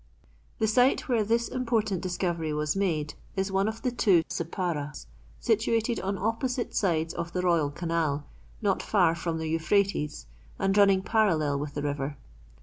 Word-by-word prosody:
The 220 - +1
site 250 +7 +3
where 235 -5 +2
this 230 +3 +1
important 225 -7 0
discovery 175 -3 -2
was 150 +1 0
made 160 -7 0 0.2
is 190 0 -1
one 195 +1 +2
of 220 +1 -4
the 250 - +1
two 195 -8 +4
Sipparas, 165 -4 -3 0.3
situated 225 +1 +1
on 195 +1 -2
opposite 235 +5 -1
sides 165 -4 +1
of 170 0 -5
the 180 - -1
royal 170 -5 +3
canal, 155 -2 -1 0.4
not 195 -2 +2
far 180 -6 +3
from 165 -1 -3
the 160 0 -3
Euphrates, 165 - 0 0.3
and 195 0 +1
running 195 -2 +5
parallel 160 -11 +2
with 145 0 -5
the 145 - -2
river. 145 -1 -2
185 Hz, 155 wpm, -28 LUFS, 160-215 Hz, 0.4 s, running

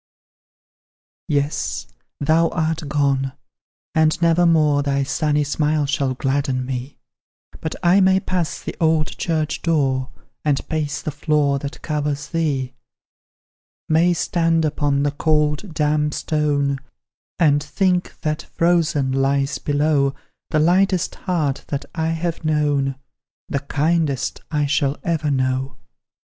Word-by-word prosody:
Yes, 140 - -1 0.3
thou 160 +3 +3
art 160 -1 -2
gone! 135 -2 +1 0.6
and 160 -1 +3
never 170 +1 +4
more 150 -3 +4
Thy 140 -1 0
sunny 150 +2 +1
smile 150 +1 0
shall 140 -2 0
gladden 135 -1 -1
me; 130 +1 -5 0.6
But 160 - -4
I 180 +3 +5
may 190 0 +4
pass 180 -3 -2
the - - -5
old 160 -2 +3
church 155 -3 -1
door, 135 -6 +1 0.3
And 145 -2 0
pace 150 -2 -2
the 155 - -2
floor 145 -1 +1
that 140 +2 -7
covers 145 -2 -2
thee, 140 -6 -1 1.1
May 170 +2 +4
stand 165 -1 +1
upon 145 -2 +1
the 145 - +1
cold, 150 +4 0
damp 150 -1 +1
stone, 145 -3 0 0.6
And 145 -4 +4
think 180 +4 -1
that, 155 0 -1
frozen, 165 -5 +2
lies 135 +1 +1
below 145 -1 +1 0.3
The - - +1
lightest 180 +3 +2
heart 155 -7 -1
that 140 -1 -3
I 160 -1 -1
have 165 +1 -2
known, 145 -3 +1 0.5
The 140 - 0
kindest 145 0 0
I 150 -2 0
shall 145 0 +1
ever 160 -3 0
know. 130 -1 -1
150 Hz, 125 wpm, -21 LUFS, 140-160 Hz, 1.1 s, I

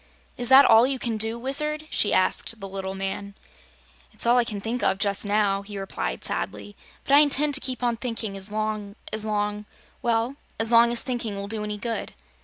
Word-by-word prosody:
"Is 245 0 -1
that 270 +1 +8
all 225 +2 +6
you 270 0 -1
can 235 -3 -3
do, 225 +2 +1
Wizard?" 300 +5 0
she 205 - +1
asked 185 +4 +1
the 195 - -7
little 190 0 -6
man. 195 +1 -5 0.8
"It's - - +1
all 240 +1 +4
I - - +3
can 215 -3 -5
think 230 +4 -4
of 190 - +1
just 200 0 +1
now," 200 -1 +1
he 200 0 -9
replied 60 - -5
sadly. 205 - -3 0.3
"But 275 - -1
I 285 - +8
intend 295 0 +4
to 280 - +4
keep 255 -1 -5
on 240 -1 0
thinking 230 -4 -5
as 195 +1 -2
long 215 -1 -4 0.2
as 215 0 +1
long 210 0 -2 0.3
well, 235 +3 -1 0.2
as 225 +1 +1
long 235 0 +5
as 235 - +4
thinking 240 -5 -3
will 200 0 -6
do 215 0 -2
any 210 0 -4
good." 230 +1 -4
220 Hz, 205 wpm, -24 LUFS, 200-245 Hz, 0.8 s, that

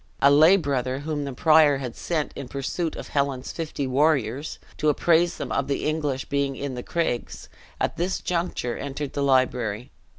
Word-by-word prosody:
A 140 - +6
lay 160 +7 +7
brother 135 -5 -1
whom 150 -1 -3
the 140 - -4
prior 155 0 +5
had 125 -3 -6
sent 160 -4 -2
in 140 - -6
pursuit 140 +5 -3
of - - -8
Helen's 140 -3 -1
fifty 155 -4 -4
warriors, 135 -1 +1 0.2
to 155 - +2
apprise 170 +3 +3
them - - -5
of 140 - 0
the 140 - -1
English 150 -4 -1
being 140 -1 -1
in 140 0 -4
the 125 - -5
craigs, 140 -5 -3 0.3
at - - -1
this 180 +3 -1
juncture 170 -8 -2
entered 140 0 -5
the 145 - -2
library. 125 -4 +1
140 Hz, 175 wpm, -25 LUFS, 130-155 Hz, 0.3 s, lay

